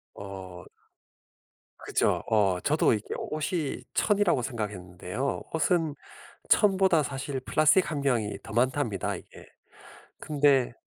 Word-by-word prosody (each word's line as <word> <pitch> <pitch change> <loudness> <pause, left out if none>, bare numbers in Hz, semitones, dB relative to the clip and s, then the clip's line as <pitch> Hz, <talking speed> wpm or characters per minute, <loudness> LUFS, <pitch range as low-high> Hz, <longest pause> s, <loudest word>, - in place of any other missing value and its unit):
어. 95 -2 -9 1.1
그죠. - - 0
어 100 -4 +3
저도 150 -4 +3
이게 105 -1 -3
옷이 155 -1 -3
천이라고 205 - +2
생각했는데요. 105 0 -4
옷은 160 -2 +1 0.5
천보다 190 -5 +4
사실 135 -1 -4
플라스틱 155 +7 +3
함량이 130 -8 -1
더 - - -10
많답니다 120 -4 0
이게. - - -14 0.7
근데 140 -4 +2
135 Hz, 235 characters per minute, -27 LUFS, 105-155 Hz, 1.1 s, 천보다